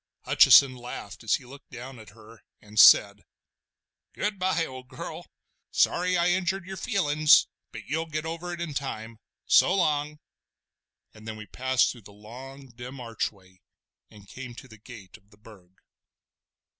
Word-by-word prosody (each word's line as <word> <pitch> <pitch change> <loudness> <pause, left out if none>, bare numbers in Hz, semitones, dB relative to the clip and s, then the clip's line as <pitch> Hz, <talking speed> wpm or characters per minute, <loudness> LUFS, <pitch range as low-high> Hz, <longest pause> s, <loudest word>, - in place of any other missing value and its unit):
Hutcheson 135 -2 +6
laughed 120 -4 -9
as 115 - +2
he 125 - -9
looked 140 +3 -14
down 125 0 -10
at 110 -1 -13
her, 110 0 -17 0.2
and 105 0 -5
said: 100 0 +7 0.9
"Goodbye, 185 -5 -1
old 130 -2 -10
girl. - - -9 0.4
Sorry 180 +1 +1
I 170 +1 +2
injured 180 0 -1
your 190 +1 -7
feelin's, 155 -7 +3 0.3
but 110 -2 -10
you'll 160 +3 -3
get 155 0 -4
over 165 +2 -5
it 175 - -6
in 170 -3 -4
time! 115 -5 -6 0.3
So 185 - +4
long!" 150 -4 0 1.0
And 110 0 -14
then 110 - -5
we 105 - -9
passed 130 +5 0
through 120 - -13
the 105 - -15
long, 130 +6 -12
dim 125 +3 -10
archway 100 -6 -6 0.5
and 100 -1 -17
came 125 0 -9
to 130 - -12
the 110 -3 -16
gate 105 -5 -13
of 100 - -31
the 105 - -22
Burg. 105 -4 -17
130 Hz, 155 wpm, -26 LUFS, 110-155 Hz, 1.0 s, said